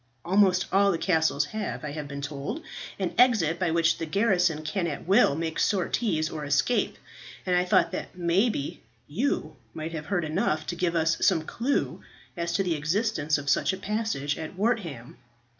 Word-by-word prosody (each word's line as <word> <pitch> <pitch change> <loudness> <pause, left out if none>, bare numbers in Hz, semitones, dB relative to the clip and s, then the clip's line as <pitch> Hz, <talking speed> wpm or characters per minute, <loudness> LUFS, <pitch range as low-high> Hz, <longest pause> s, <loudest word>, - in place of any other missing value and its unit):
Almost 185 0 +4
all 200 +1 +4
the 170 - 0
castles 160 -5 +2
have, 215 -3 -4
I 150 - -4
have 150 -1 -5
been 140 0 -6
told, 145 - -5 0.3
an 190 -3 -2
exit 210 -10 +4
by 180 -2 +1
which 165 0 +2
the 165 - -3
garrison 180 -4 +2
can 170 +3 -1
at 150 - -5
will 190 -5 +4
make 160 0 -3
sorties 185 -3 +1
or 155 -2 -5
escape; 145 +12 +1 0.5
and 180 -1 +2
I 180 0 +2
thought 180 - +3
that - - -6
maybe 175 - 0 0.3
you 235 - -2 0.2
might 160 +1 -4
have 155 -2 -6
heard 175 -5 0
enough 155 0 0
to 175 - -4
give 170 0 0
us 160 0 +1
some 170 -5 +3
clue 245 - -1 0.3
as 170 -1 -2
to 195 - +2
the 180 -3 0
existence 155 0 0
of 145 -1 -7
such 140 +7 +2
a - - -4
passage 200 -8 -2
at 160 +3 -6
Wortham." 185 - -2
170 Hz, 180 wpm, -27 LUFS, 155-200 Hz, 0.5 s, Almost